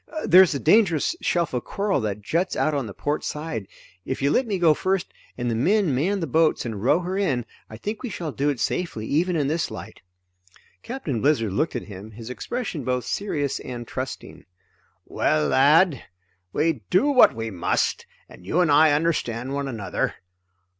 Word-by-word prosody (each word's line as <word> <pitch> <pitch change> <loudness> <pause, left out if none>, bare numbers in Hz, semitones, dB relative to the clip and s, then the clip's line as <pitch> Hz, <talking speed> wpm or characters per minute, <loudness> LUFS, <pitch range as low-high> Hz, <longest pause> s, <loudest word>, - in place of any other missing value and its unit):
"There's 180 -2 +6
a - - -1
dangerous 175 - +3
shelf 170 -5 0
of 125 - -1
coral 200 -7 -1
that 105 -1 -3
juts 170 - 0
out 155 - +1
on 140 -5 -1
the 100 - -8
port 145 +1 -2
side 150 -10 -4 0.4
if 130 - -4
you 140 +1 +1
let 255 - +2
me 200 -3 -1
go 170 -3 +5
first, 190 +3 -1 0.2
and 120 -1 -2
the 120 - 0
men 180 - +2
man 185 +10 0
the - - 0
boats 160 +1 +2
and 110 -4 -4
row 145 - +3
her 185 +2 -3
in, 135 - 0 0.2
I 110 - -9
think 210 - -5
we 250 - -4
shall 170 -6 -4
do 140 +2 0
it 140 -4 -2
safely 140 -10 -2
even 170 +8 +1
in 150 -3 +1
this 160 +3 -1
light." - - -9 0.8
Captain 225 - -4
Blizzard 115 -9 +2
looked 155 +11 0
at - - -3
him, 100 +1 -10
his 115 +3 -8
expression 195 - -4
both 125 -1 -1
serious 145 -8 -2
and 120 -2 -7
trusting. - - -6 0.6
"Well 75 -1 +1
lad, 150 +2 +4 0.5
we 160 - 0
do 185 +9 +3
what 260 - +6
we 115 0 -4
must, 85 -3 -1 0.2
and - - -15
you 130 - 0
and 175 -4 +3
I 150 +1 +6
understand 135 -5 -1
one 140 0 -2
another. 110 -7 -2
145 Hz, 190 wpm, -24 LUFS, 120-175 Hz, 0.8 s, There's